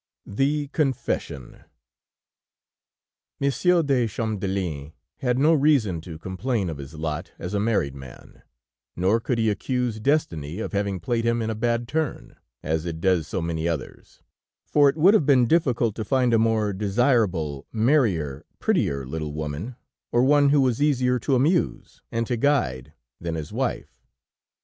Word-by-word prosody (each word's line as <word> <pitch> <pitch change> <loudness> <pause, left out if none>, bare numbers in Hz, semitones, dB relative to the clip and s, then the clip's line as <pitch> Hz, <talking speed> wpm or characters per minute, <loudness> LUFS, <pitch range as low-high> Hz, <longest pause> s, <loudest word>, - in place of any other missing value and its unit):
THE 145 +7 0
CONFESSION 130 - -3 1.8
Monsieur 170 +5 +2
de 130 -5 +2
Champdelin 95 -9 -3 0.2
had 125 -1 0
no 150 +5 +4
reason 135 - +2
to 80 -1 -9
complain 95 +3 -2
of 75 - -8
his 70 +3 -9
lot 75 -1 -4
as 90 +3 -6
a 100 - +1
married 100 -11 0
man; 65 -3 -13 0.5
nor 95 +6 +2
could 120 +1 -2
he 110 -1 +1
accuse 125 +1 -2
destiny 105 - -1
of 110 - -5
having 100 -2 -1
played 115 +7 -1
him 115 0 +1
in 110 -1 -1
a - - -1
bad 115 +2 -1
turn, 155 -1 -3 0.3
as 80 0 -1
it 80 -1 -4
does 90 -4 +1
so 95 - -3
many 85 0 -2
others, 80 -6 -6 0.4
for 145 -1 +4
it 140 - -3
would 180 +6 +6
have 170 -10 +3
been 130 -4 +5
difficult 120 -6 +2
to 110 - -2
find 125 +1 +1
a 115 - +4
more 110 -2 +1
desirable, 100 - 0
merrier, 110 - +1
prettier 70 -1 0
little 75 +2 -5
woman, 75 - -5 0.4
or 120 +1 +3
one 145 +1 +5
who 145 0 +4
was 130 -1 +1
easier 125 -4 +2
to 135 +3 +1
amuse 155 +8 0
and 115 0 -1
to 120 - -1
guide 75 - 0 0.3
than 85 -1 -4
his 75 -2 -6
wife. - - -3
110 Hz, 155 wpm, -24 LUFS, 85-130 Hz, 1.8 s, would